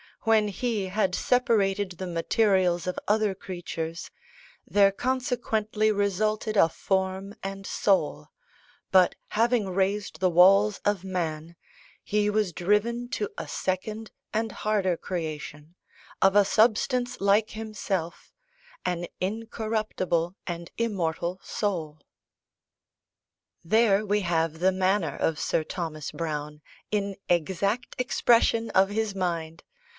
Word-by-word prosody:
When 220 -2 +3
He 205 -1 -2
had 185 -1 0
separated 205 -6 +1
the 185 +2 -6
materials 180 0 +2
of 180 - -3
other 210 0 +2
creatures, 170 -3 -6 0.6
there 200 -1 +5
consequently 220 -3 0
resulted 215 +2 0
a 165 - +6
form 190 +3 -2
and 195 0 -5
soul: 195 -1 +1 0.6
but 185 -2 +5 0.2
having 230 -2 +1
raised 195 +2 -1
the 185 0 +3
walls 195 +4 +5
of 205 -3 +1
man, 170 -3 -3 0.5
He 210 0 +1
was 210 -4 0
driven 220 +7 0
to 420 - -2
a - - -5
second 210 +4 -3 0.2
and 220 0 -1
harder 195 -5 0
creation 155 -2 -6 0.5
of 195 +1 +4
a 205 -1 +6
substance 245 +4 +2
like 205 +2 +3
Himself, 200 -6 -4 0.5
an 175 -1 -1
incorruptible 215 -4 -2
and 170 -1 -5
immortal 180 -5 -1
soul. 165 -7 -3 1.6
There, 215 +2 +3
we 205 +1 +1
have 165 -3 0
the 185 +2 +4
manner 185 -4 +1
of 160 -2 -1
Sir 160 - 0
Thomas 155 -3 -5
Browne, 150 -2 -4 0.3
in 200 -2 -1
exact 190 +7 0
expression 230 -2 +3
of 195 +1 +4
his 215 0 -1
mind! 165 -3 -3
195 Hz, 115 wpm, -27 LUFS, 175-215 Hz, 1.6 s, a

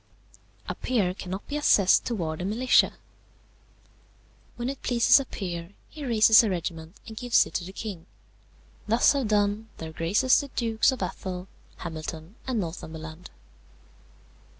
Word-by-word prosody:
"A - - -2
peer 210 -8 0
cannot 190 +1 -6
be 290 - -4
assessed 205 -10 +4
towards 165 -9 -3
the 180 - -3
militia. 235 +6 +3 1.6
"When 240 0 -4
it 275 +1 -5
pleases 240 +2 +5
a 275 - -4
peer 175 -5 -6 0.2
he 305 - -9
raises 225 -2 +6
a 220 - 0
regiment 165 -1 -4
and 220 - -9
gives 245 +1 +3
it - - -12
to - - -2
the 185 - -8
king; 195 -4 -7 0.8
thus 230 +6 +4
have 275 -5 -1
done 210 +1 +1
their 160 -1 -7
graces 195 +11 +3
the 285 - -7
Dukes 230 -3 +1
of 260 - -4
Athol, 185 -1 -5 0.3
Hamilton, 160 +1 -7
and 250 -4 0
Northumberland. 160 -1 -7
205 Hz, 145 wpm, -26 LUFS, 170-235 Hz, 1.6 s, raises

